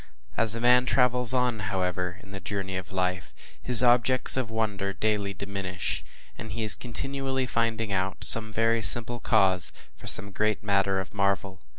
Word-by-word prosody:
As 115 Hz, -1 st, +4 dB
a -, -, -4 dB
man 125 Hz, +1 st, +3 dB
travels 125 Hz, -2 st, +3 dB
on, 125 Hz, -3 st, 0 dB
however, 90 Hz, -1 st, -3 dB
in 100 Hz, -, -15 dB
the 95 Hz, -, -7 dB
journey 95 Hz, 0 st, -5 dB
of 95 Hz, -3 st, -6 dB
life, 90 Hz, -2 st, -3 dB, 0.3 s
his 125 Hz, 0 st, +6 dB
objects 125 Hz, +1 st, +3 dB
of 130 Hz, -4 st, -2 dB
wonder 105 Hz, -3 st, -3 dB
daily 105 Hz, 0 st, -2 dB
diminish, 95 Hz, -1 st, -5 dB, 0.4 s
and 110 Hz, -2 st, -8 dB
he 115 Hz, +1 st, -4 dB
is 105 Hz, -2 st, +8 dB
continually 130 Hz, +4 st, -1 dB
finding 115 Hz, -2 st, -2 dB
out 95 Hz, 0 st, -3 dB
some 110 Hz, -1 st, +5 dB
very 115 Hz, +1 st, 0 dB
simple 120 Hz, +4 st, -1 dB
cause 95 Hz, -6 st, +1 dB, 0.2 s
for -, -, -14 dB
some 100 Hz, +1 st, 0 dB
great 105 Hz, +1 st, -1 dB
matter 100 Hz, -1 st, 0 dB
of 95 Hz, -, -7 dB
marvel. 100 Hz, -1 st, -2 dB
105 Hz, 170 wpm, -26 LUFS, 95-120 Hz, 0.4 s, is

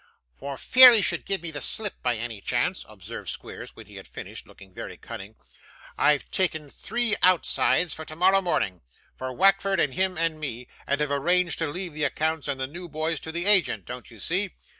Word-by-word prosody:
'For 140 Hz, -, -7 dB
fear 255 Hz, -, +9 dB
he 215 Hz, -3 st, +5 dB
should -, -, -1 dB
give 195 Hz, -2 st, -2 dB
me 165 Hz, -, -4 dB
the 145 Hz, -2 st, -5 dB
slip, 210 Hz, +6 st, -1 dB
by 125 Hz, -1 st, 0 dB
any 115 Hz, -2 st, -6 dB
chance,' -, -, -1 dB
observed -, -, -8 dB
Squeers, -, -, -8 dB
when -, -, -12 dB
he -, -, -14 dB
had -, -, -11 dB
finished, -, -, -9 dB
looking 95 Hz, -1 st, -17 dB
very -, -, -8 dB
cunning, 100 Hz, +3 st, -10 dB, 0.6 s
'I've 150 Hz, -1 st, +2 dB
taken 155 Hz, -6 st, -1 dB
three 240 Hz, -2 st, -1 dB
outsides 180 Hz, -2 st, +2 dB
for 160 Hz, -, -7 dB
tomorrow 180 Hz, +5 st, +2 dB
morning 95 Hz, -, -1 dB, 0.3 s
for 130 Hz, 0 st, -5 dB
Wackford 195 Hz, +4 st, +3 dB
and 140 Hz, -, +1 dB
him 185 Hz, +1 st, 0 dB
and 165 Hz, -1 st, 0 dB
me 125 Hz, -5 st, -6 dB, 0.2 s
and 140 Hz, -, 0 dB
have 150 Hz, -1 st, 0 dB
arranged 170 Hz, +4 st, +1 dB
to 160 Hz, -, 0 dB
leave 175 Hz, +2 st, -6 dB
the 150 Hz, 0 st, -1 dB
accounts 160 Hz, +1 st, -1 dB
and 140 Hz, -2 st, -2 dB
the 130 Hz, -, -1 dB
new 170 Hz, +6 st, -9 dB
boys 155 Hz, 0 st, -2 dB
to 160 Hz, -, -7 dB
the 170 Hz, +2 st, -3 dB
agent, 190 Hz, -, +4 dB
don't 125 Hz, -1 st, -8 dB
you 115 Hz, -3 st, -15 dB
see? 185 Hz, -, 0 dB
160 Hz, 205 wpm, -25 LUFS, 140-185 Hz, 0.6 s, fear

